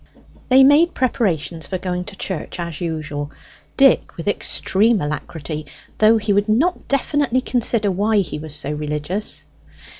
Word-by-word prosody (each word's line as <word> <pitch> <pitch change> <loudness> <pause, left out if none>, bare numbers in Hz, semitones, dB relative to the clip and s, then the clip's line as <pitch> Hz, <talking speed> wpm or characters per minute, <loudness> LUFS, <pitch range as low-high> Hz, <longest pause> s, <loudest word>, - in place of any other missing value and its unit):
They 260 +1 +7
made 295 +6 +5
preparations 180 - -1
for 185 - -2
going 180 -1 -3
to 205 - -9
church 185 -2 -5
as 170 -2 -5
usual; 150 -3 -4 0.5
Dick 270 -3 +4
with 165 - -7
extreme 205 +2 +1
alacrity, 150 0 -5 0.3
though 220 +1 +6
he 210 -1 0
would 205 +2 +1
not 280 +12 +1
definitely 275 -1 +1
consider 230 -5 0
why 210 +4 +1
he 185 -6 -1
was 155 -1 -5
so 150 -1 -2
religious. 150 +7 -3
195 Hz, 145 wpm, -20 LUFS, 155-235 Hz, 0.5 s, They